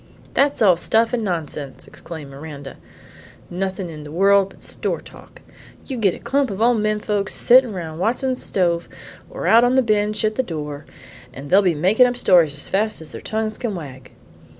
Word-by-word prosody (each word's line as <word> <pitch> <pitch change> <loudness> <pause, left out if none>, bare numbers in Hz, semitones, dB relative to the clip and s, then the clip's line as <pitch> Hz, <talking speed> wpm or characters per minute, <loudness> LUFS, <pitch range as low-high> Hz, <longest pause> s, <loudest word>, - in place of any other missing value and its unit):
"That's 280 -4 +2
all 185 -5 +5
stuff 225 +6 +1
and 235 -2 0
nonsense," 155 -7 -4
exclaimed 160 -5 -10
Miranda; 140 -1 -9 0.7
"nothin' 190 +1 -3
in 155 -3 -9
the 150 - -10
world 195 +3 +3
but - - -14
store - - -2
talk. - - -15 0.4
You 265 - -5
git 200 -6 +1
a - - -11
clump 270 +2 0
o' 225 +5 +2
men 215 -1 0
folks 205 -2 -1
settin' 250 -1 +5
round 165 -3 -6
Watson's 250 +6 0
stove, 170 -3 0 0.4
or - - -6
out 230 +2 +6
on 245 +1 +3
the 265 - +4
bench 215 -1 0
at 215 - +1
the 260 - 0
door, 150 - -6 0.5
an' 140 +2 -9
they'll 195 +2 +6
make 185 +9 +1
up 250 -1 +5
stories 170 -9 +4
as 145 - -3
fast 215 +3 0
as 155 - -11
their - - -8
tongues 220 0 -3
can 230 -5 -3
wag. 135 -6 -9
195 Hz, 185 wpm, -21 LUFS, 160-225 Hz, 0.7 s, out